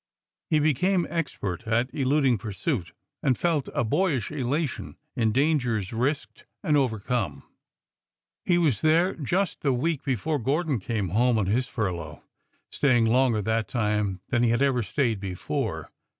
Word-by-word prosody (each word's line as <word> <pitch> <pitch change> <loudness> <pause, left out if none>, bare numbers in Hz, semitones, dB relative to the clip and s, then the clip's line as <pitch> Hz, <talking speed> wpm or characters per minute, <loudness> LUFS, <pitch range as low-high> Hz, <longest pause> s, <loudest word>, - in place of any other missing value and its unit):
He 155 - +3
became 170 +5 +2
expert 105 - -3
at 120 +3 +1
eluding 135 -3 +2
pursuit, 105 - -3 0.3
and 130 - +2
felt 165 -5 0
a - - 0
boyish 135 - 0
elation 145 +1 -2 0.2
in 110 -2 +2
dangers 125 -7 +1
risked 135 +6 -2 0.2
and 150 - +2
overcome. 115 - -1 1.0
He 175 - +2
was 150 - +2
there 165 +4 +3
just 175 +5 -1
the 140 -3 +2
week 150 +4 0
before 140 +3 -1
Gordon 145 +2 0
came 100 -1 -2
home 120 +5 +2
on 105 - +1
his 120 +7 +1
furlough, 90 -10 -4 0.5
staying 120 -5 +3
longer 115 -2 +3
that 110 +1 0
time 105 -5 -1
than 120 -2 +2
he 120 - +3
had 120 +4 +2
ever 130 -3 +2
stayed 115 -2 0
before. 95 -2 -3
125 Hz, 145 wpm, -26 LUFS, 110-150 Hz, 1.0 s, He